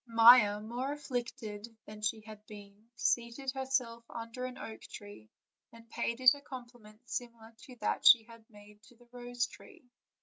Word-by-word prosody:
Maia, 230 Hz, -2 st, +7 dB
more 245 Hz, +6 st, -4 dB
afflicted 240 Hz, -6 st, -5 dB, 0.2 s
than 210 Hz, 0 st, -11 dB
she 210 Hz, +1 st, -1 dB
had 215 Hz, -1 st, -11 dB
yet 210 Hz, -, -40 dB
been, 205 Hz, +1 st, -13 dB
seated 240 Hz, +2 st, 0 dB
her 265 Hz, 0 st, -5 dB
self 235 Hz, -3 st, -1 dB
under 230 Hz, +2 st, -6 dB
an 255 Hz, 0 st, -7 dB
oak 220 Hz, -, -8 dB
tree, 205 Hz, -, -11 dB, 0.4 s
and 230 Hz, 0 st, -16 dB
paid 235 Hz, +1 st, -2 dB
it 255 Hz, +1 st, +8 dB
a 285 Hz, -, -10 dB
compliment 240 Hz, -4 st, -12 dB
similar 230 Hz, -2 st, -6 dB
to 255 Hz, -, -13 dB
that -, -, -1 dB
she 235 Hz, -2 st, +9 dB
had 230 Hz, 0 st, -15 dB
made 210 Hz, -1 st, -17 dB
to 230 Hz, +2 st, -20 dB
the 240 Hz, +1 st, -22 dB
rose 245 Hz, 0 st, -2 dB
tree. 345 Hz, -, -16 dB
235 Hz, 175 wpm, -32 LUFS, 215-250 Hz, 0.4 s, she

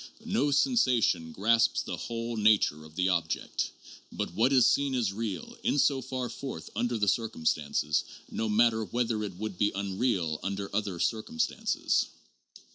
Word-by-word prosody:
No 145 Hz, -, +1 dB
sensation 125 Hz, -, +2 dB
"grasps" 115 Hz, +5 st, +2 dB
the -, -, -4 dB
whole 115 Hz, 0 st, -4 dB
nature 105 Hz, -8 st, +3 dB
of 80 Hz, 0 st, -15 dB
the 90 Hz, 0 st, +1 dB
object. 85 Hz, -3 st, -1 dB, 0.4 s
But -, -, -4 dB
what 115 Hz, +8 st, +3 dB
is 130 Hz, -3 st, +6 dB
seen 140 Hz, +1 st, +2 dB
is 115 Hz, -6 st, 0 dB
real 105 Hz, -5 st, -4 dB
in -, -, +1 dB
so 140 Hz, -1 st, +3 dB
far 130 Hz, 0 st, -3 dB
forth 130 Hz, -11 st, -7 dB
under 120 Hz, +2 st, 0 dB
the 105 Hz, -1 st, 0 dB
circumstances, 80 Hz, -8 st, 0 dB, 0.3 s
no 110 Hz, -1 st, -2 dB
matter 110 Hz, +1 st, +3 dB
whether 115 Hz, -1 st, -1 dB
it 95 Hz, -4 st, -6 dB
would 105 Hz, -2 st, -5 dB
be 105 Hz, 0 st, +3 dB
unreal 95 Hz, -5 st, -1 dB
under 100 Hz, +1 st, -4 dB
other 100 Hz, -5 st, -1 dB
circumstances. 110 Hz, -7 st, 0 dB
110 Hz, 150 wpm, -29 LUFS, 95-120 Hz, 0.4 s, is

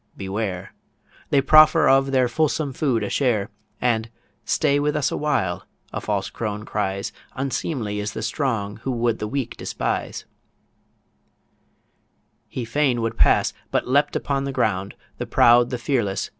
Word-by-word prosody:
beware! 95 Hz, -1 st, -4 dB, 0.6 s
They 140 Hz, -, +4 dB
proffer 155 Hz, +2 st, +6 dB
of 135 Hz, 0 st, +4 dB
their 130 Hz, -2 st, +3 dB
fulsome 150 Hz, +1 st, 0 dB
food 125 Hz, -6 st, 0 dB
a 105 Hz, -, -2 dB
share, 110 Hz, -8 st, +1 dB, 0.3 s
And, 115 Hz, -2 st, 0 dB, 0.4 s
'Stay 145 Hz, -2 st, +2 dB
with 150 Hz, +1 st, 0 dB
us 150 Hz, -3 st, +1 dB
a -, -, -2 dB
while,' 95 Hz, -12 st, -1 dB, 0.3 s
a -, -, -3 dB
false 100 Hz, -2 st, -2 dB
crone 105 Hz, -1 st, -4 dB
cries 100 Hz, -2 st, -2 dB, 0.2 s
'Unseemly 130 Hz, -5 st, -2 dB
is 105 Hz, +1 st, -3 dB
the 110 Hz, -, -5 dB
strong 115 Hz, -4 st, -2 dB
who 115 Hz, -, -5 dB
would 120 Hz, -2 st, 0 dB
the 105 Hz, -, -3 dB
weak 130 Hz, 0 st, -3 dB
despise' -, -, -3 dB, 2.2 s
He 125 Hz, -, -5 dB
fain 125 Hz, 0 st, +1 dB
would 115 Hz, -, -2 dB
pass, -, -, +3 dB, 0.2 s
but -, -, 0 dB
leapt 140 Hz, +3 st, +2 dB
upon 140 Hz, -1 st, -1 dB
the 140 Hz, -, -2 dB
ground, 100 Hz, -6 st, -1 dB, 0.2 s
The -, -, -3 dB
proud, 120 Hz, +1 st, +5 dB
the 125 Hz, -, -2 dB
fearless! 120 Hz, -6 st, -1 dB
120 Hz, 150 wpm, -23 LUFS, 105-140 Hz, 2.2 s, proffer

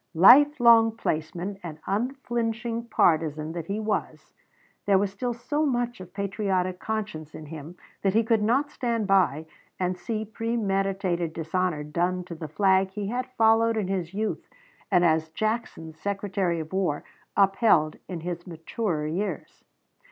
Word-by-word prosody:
Life 275 Hz, -, +7 dB
long 230 Hz, -2 st, +6 dB
placeman 175 Hz, +2 st, -3 dB
and 160 Hz, -3 st, -7 dB
unflinching 235 Hz, 0 st, -2 dB
partisan 155 Hz, -6 st, +1 dB
that 165 Hz, -1 st, -6 dB
he 200 Hz, +2 st, -2 dB
was, 215 Hz, 0 st, -3 dB, 0.5 s
there 200 Hz, -1 st, +5 dB
was 195 Hz, 0 st, 0 dB
still 240 Hz, +4 st, -3 dB
so 285 Hz, +6 st, -1 dB
much 240 Hz, -5 st, -1 dB
of 180 Hz, -1 st, -11 dB
patriotic 195 Hz, -2 st, -1 dB
conscience 210 Hz, -9 st, -4 dB
in 155 Hz, -, -8 dB
him 160 Hz, +3 st, -9 dB, 0.2 s
that 195 Hz, 0 st, +1 dB
he 225 Hz, -, +4 dB
could 225 Hz, -1 st, +2 dB
not 265 Hz, +7 st, +1 dB
stand 230 Hz, -3 st, -1 dB
by 185 Hz, -6 st, +2 dB, 0.3 s
and 180 Hz, 0 st, 0 dB
see 215 Hz, +4 st, -4 dB
premeditated 195 Hz, -6 st, -1 dB
dishonor 165 Hz, -1 st, -1 dB
done 175 Hz, +4 st, -1 dB
to 175 Hz, -1 st, -8 dB
the 160 Hz, -1 st, -6 dB
flag 190 Hz, +4 st, +3 dB
he 200 Hz, 0 st, -4 dB
had 250 Hz, +2 st, -2 dB
followed 225 Hz, 0 st, +4 dB
in 205 Hz, -4 st, -1 dB
his 180 Hz, -4 st, -2 dB
youth 215 Hz, +2 st, -3 dB, 0.4 s
and 180 Hz, -3 st, +4 dB
as 160 Hz, -1 st, +2 dB
Jackson's 165 Hz, -5 st, -3 dB
Secretary 195 Hz, -3 st, -1 dB
of 160 Hz, +2 st, -7 dB
War 185 Hz, -6 st, 0 dB, 0.3 s
upheld 195 Hz, -6 st, +3 dB
in 175 Hz, -3 st, -5 dB
his 175 Hz, +1 st, -5 dB
maturer 165 Hz, 0 st, -3 dB
years. 180 Hz, +7 st, -4 dB
195 Hz, 150 wpm, -26 LUFS, 170-225 Hz, 0.5 s, Life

